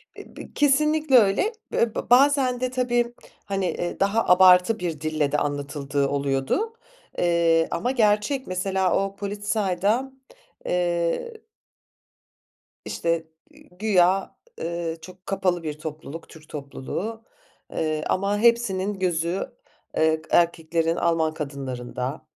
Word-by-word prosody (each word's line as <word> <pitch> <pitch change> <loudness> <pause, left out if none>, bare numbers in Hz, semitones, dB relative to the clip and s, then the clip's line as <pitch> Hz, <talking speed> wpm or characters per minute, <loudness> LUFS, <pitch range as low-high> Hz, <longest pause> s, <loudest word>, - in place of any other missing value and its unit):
B - - -13
b - - -10
kesinlikle 300 -1 +3
öyle. 220 - +3 0.2
Be 225 -2 +1
be - - -4
bazen 260 -1 +4
de 255 0 -1
tabii, 240 -1 0 0.3
hani, 195 -1 -1
eee, 175 0 -3
daha 200 +4 +2
abartı 180 +3 +6
bir 165 -4 -4
dille 155 -2 0
de 150 - +2
anlatıldığı 145 -1 -1
oluyordu, 140 - -1 0.4
eee, 170 -1 +3
ama 245 +9 -1
gerçek 225 +3 +1
mesela 185 0 0
o 195 0 -7
Polizei'da 205 +4 -1 0.5
eee 175 - -1 1.4
işte, 165 -1 -1 0.2
iii, - - -20
güya, 195 -3 +2 0.2
eee, 170 -1 -3
çok 185 +2 -13
kapalı 185 -3 0
bir 150 -1 -5
topluluk 155 0 -8
Türk 155 -2 -15
topluluğu. 155 +10 -5 0.5
Eee, 155 -1 -1
ama 200 +2 +1
hepsinin 210 -4 +2
gözü, 175 +5 -1 0.5
eee, 160 0 +2
erkeklerin 165 -1 +2
Alman 160 -2 +1
kadınlarında, 135 -1 -5
180 Hz, 115 wpm, -24 LUFS, 160-220 Hz, 1.4 s, abartı